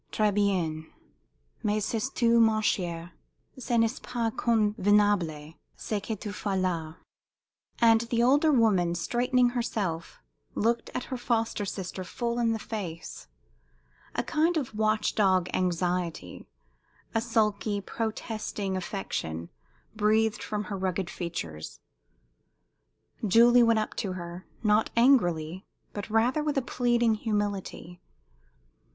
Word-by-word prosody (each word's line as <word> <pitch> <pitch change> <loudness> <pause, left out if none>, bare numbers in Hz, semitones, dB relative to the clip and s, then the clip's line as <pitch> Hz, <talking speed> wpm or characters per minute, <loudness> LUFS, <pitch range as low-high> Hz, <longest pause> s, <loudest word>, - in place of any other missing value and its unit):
"Très 210 -1 +2
bien. 175 -6 0 0.7
Mais 210 0 0
sais 230 +3 -1
tu, 235 -3 +3
ma 220 -1 +4
chère, 175 -5 -1 0.5
ce 245 -1 0
n'est 230 +2 +1
pas 235 -2 -2
convenable, 205 -9 +1 0.2
ce 215 - -2
que 220 +2 -4
tu 210 0 -6
fais 200 -1 -2
là!" 165 -4 -2 0.8
And 225 -1 +5
the 235 -1 +2
older 290 +5 +4
woman, 200 -9 +3
straightening 245 +7 +2
herself, 205 -9 -3 0.4
looked 230 +2 0
her 255 - -5
foster 230 -3 -1
sister 185 -1 -5
full 235 +5 -3
in 230 -1 +2
the 225 - 0
face. 170 - -6 0.9
A - - 0
kind 325 +3 +1
of 265 -7 -3
watch 215 0 +1
dog 185 -4 +3
anxiety, 175 - -2 0.7
a 225 - +1
sulky, 215 -3 0
protesting 215 -2 -4
affection 175 - -4 0.5
breathed 215 +1 +2
from 210 -1 -3
her 200 -2 -5
rugged 185 -1 -2
features. 85 - -6 1.5
Julie 235 +4 +6
went 230 -1 +4
up 215 - -1
to 195 -5 -2
her, 175 0 -8 0.2
not 210 0 +3
angrily, 180 - +3 0.3
but 205 +1 -6
rather 235 +7 +2
with 300 -1 -1
a 270 - +1
pleading 240 -2 +2
humility. 205 -5 -3
210 Hz, 120 wpm, -28 LUFS, 185-230 Hz, 1.5 s, Julie